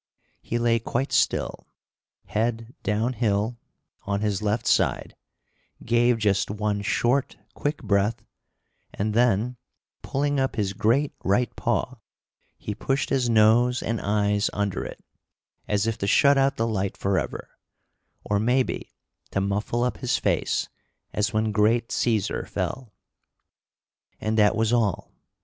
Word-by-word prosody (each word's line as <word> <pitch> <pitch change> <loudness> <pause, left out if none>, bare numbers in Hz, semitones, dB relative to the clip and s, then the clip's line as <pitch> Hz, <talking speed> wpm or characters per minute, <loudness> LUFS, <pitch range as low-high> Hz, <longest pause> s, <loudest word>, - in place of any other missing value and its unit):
He 120 - -2
lay 120 -1 +2
quite 120 +4 -2
still, - - 0 0.6
head 115 +2 -2
down 110 +5 0
hill, 110 0 0 0.4
on 100 0 -2
his 105 -1 0
left 105 +2 -1
side, - - +1 0.7
gave 120 +1 +3
just 105 -3 +1
one 105 0 -1
short, 120 +5 0 0.2
quick 145 +1 -3
breath, 100 +2 +1 0.7
and 105 +1 -1
then, 120 +1 +2 0.4
pulling 145 +1 -1
up 135 0 0
his 100 -2 -1
great 125 +9 +1
right 105 +4 +1
paw, - - -1 0.6
he 105 - -5
pushed 135 +6 -1
his 130 -3 +2
nose 115 +3 +4
and 115 0 -2
eyes 105 0 +1
under 100 -3 -1
it, - - -9 0.6
as 105 0 +1
if 115 -1 -2
to 100 - -1
shut 140 +7 +5
out 135 0 +2
the 115 - +1
light 100 -4 -2
forever, 95 -6 -2 0.7
or, 105 -1 0
maybe, 125 +4 0 0.4
to - - -1
muffle 105 +4 -1
up 125 - -1
his 125 - 0
face - - 0 0.5
as 105 +2 0
when 110 0 0
"great 110 +3 +2
Cæsar 110 -5 0
fell." 125 -4 -4 1.3
And 110 0 -1
that 105 -1 +4
was 115 +1 +1
all. 110 -6 0
110 Hz, 135 wpm, -25 LUFS, 105-120 Hz, 1.3 s, shut